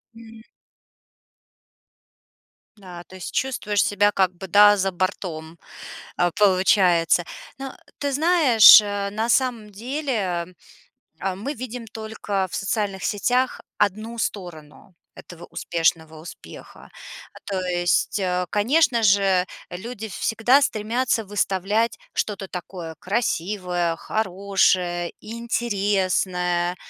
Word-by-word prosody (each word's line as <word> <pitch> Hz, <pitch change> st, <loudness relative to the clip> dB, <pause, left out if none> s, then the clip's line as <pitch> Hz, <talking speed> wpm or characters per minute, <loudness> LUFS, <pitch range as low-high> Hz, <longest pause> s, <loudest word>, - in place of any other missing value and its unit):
М. 225 Hz, -1 st, -13 dB, 2.4 s
Да, 180 Hz, -3 st, -11 dB
то 185 Hz, -, -14 dB
есть 185 Hz, -, -8 dB
чувствуешь 210 Hz, -6 st, 0 dB
себя 205 Hz, 0 st, +2 dB
как 190 Hz, -3 st, +1 dB
бы, 190 Hz, +2 st, -9 dB
да, 205 Hz, +3 st, +6 dB
за 195 Hz, 0 st, 0 dB
бортом, 170 Hz, -3 st, -4 dB, 0.6 s
э, 175 Hz, -, +2 dB
получается. 185 Hz, -4 st, +3 dB, 0.3 s
Ну, 270 Hz, 0 st, -6 dB, 0.3 s
ты 285 Hz, -1 st, -2 dB
знаешь, 290 Hz, -, +7 dB
э, 205 Hz, -1 st, -3 dB
на 220 Hz, +3 st, -2 dB
самом 240 Hz, -3 st, 0 dB
деле, 215 Hz, -, -3 dB, 0.7 s
э, 190 Hz, 0 st, -2 dB
мы 225 Hz, +10 st, -5 dB
видим 245 Hz, -2 st, -7 dB
только 220 Hz, -3 st, -4 dB
в -, -, -9 dB
социальных 195 Hz, -2 st, -2 dB
сетях 250 Hz, +5 st, 0 dB, 0.2 s
1 215 Hz, +3 st, -1 dB
сторону 175 Hz, -4 st, -6 dB, 0.2 s
этого 175 Hz, -1 st, -12 dB
успешного 165 Hz, -2 st, -2 dB
успеха. 165 Hz, -, -13 dB, 0.4 s
А -, -, -14 dB
то 195 Hz, -2 st, -2 dB
есть, 175 Hz, +3 st, 0 dB
э, 180 Hz, -1 st, -1 dB
конечно 240 Hz, +2 st, +2 dB
же, 195 Hz, -3 st, +3 dB, 0.2 s
люди 220 Hz, +4 st, -7 dB
всегда 225 Hz, +7 st, +2 dB
стремятся 230 Hz, 0 st, -1 dB
выставлять 205 Hz, +2 st, -1 dB, 0.2 s
что-то 200 Hz, -2 st, -3 dB
такое 175 Hz, -2 st, -7 dB
красивое, 180 Hz, -4 st, -2 dB
хорошее, 185 Hz, -3 st, 0 dB
интересное, 190 Hz, -6 st, -1 dB
200 Hz, 105 wpm, -23 LUFS, 180-225 Hz, 2.4 s, знаешь